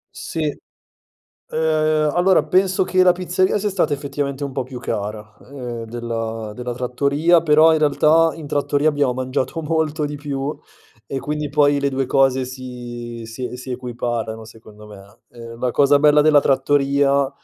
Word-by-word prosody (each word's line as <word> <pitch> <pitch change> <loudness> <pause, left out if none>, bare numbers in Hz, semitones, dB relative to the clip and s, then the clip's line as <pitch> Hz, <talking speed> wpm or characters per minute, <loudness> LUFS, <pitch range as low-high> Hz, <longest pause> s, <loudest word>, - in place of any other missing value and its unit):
Sì, 160 - -5 0.9
ehm, 155 -1 0
allora 180 -1 +4
penso 185 +4 +2
che 185 0 +2
la 180 -1 +6
pizzeria 185 +2 0
sia 210 +1 -1
stata 190 -6 0
effettivamente 140 0 -3
un 140 - -5
po' 130 - -2
più 130 0 -9
cara, 105 0 -5
ehm, 125 -4 -7
della 115 -1 -5
della 125 +1 -5
trattoria 140 +7 +1
però 160 0 +5
in 155 - 0
realtà 155 +2 +3
in 160 -2 -9
trattoria 145 +1 0
abbiamo 145 -4 +1
mangiato 130 +4 -3
molto 155 -1 -1
di 145 0 -6
più 140 0 -4 0.5
e 135 - -4
quindi 150 +1 -4
poi 145 -1 +3
le 140 0 0
2 135 0 -1
cose 130 -1 +2
si 120 -2 -8
si 125 +2 -6
si 130 +1 -6
equiparano, 120 -3 -4
secondo 110 -1 -15
me. 100 +1 -15 0.2
Ehm, 115 0 -10
la 125 - 0
cosa 140 +3 +4
bella 150 0 +5
della 150 -1 +5
trattoria 140 0 +2
140 Hz, 160 wpm, -20 LUFS, 125-150 Hz, 0.9 s, la